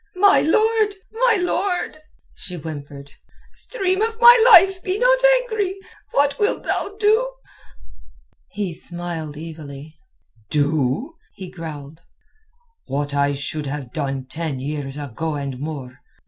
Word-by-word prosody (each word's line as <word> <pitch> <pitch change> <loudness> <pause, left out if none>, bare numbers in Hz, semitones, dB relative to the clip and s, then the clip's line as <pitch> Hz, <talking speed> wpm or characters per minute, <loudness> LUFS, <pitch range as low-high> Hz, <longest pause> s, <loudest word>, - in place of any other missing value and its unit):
"My 395 +2 +5
lord, 435 +4 +2 0.2
my 465 +1 +3
lord!" 360 -2 -1 0.3
she 180 - -8
whimpered. 145 -3 -8 0.4
"Stream 380 -4 -2
of 450 +1 -1
my 480 0 +10 0.2
life, 380 0 +7
be 370 +2 -2
not - - +4 0.2
angry! 415 -5 -2 0.4
What 280 0 +2
wilt 415 - 0
thou 405 - -2
do?" 440 +4 +3 1.2
He 200 -4 -4
smiled 165 -3 -5
evilly. 155 -1 -9 0.5
"Do?" 150 - 0 0.2
he 185 -3 -9
growled. 160 -3 -9 0.9
"What 145 +1 -2
I 140 0 +2
should 145 +1 -4
have 135 -3 -6
done 135 -3 -3
ten 150 0 -4
years 140 0 -5
ago 150 +3 -4
and 140 -3 -5
more. 140 -4 -6
165 Hz, 120 wpm, -21 LUFS, -, 1.2 s, my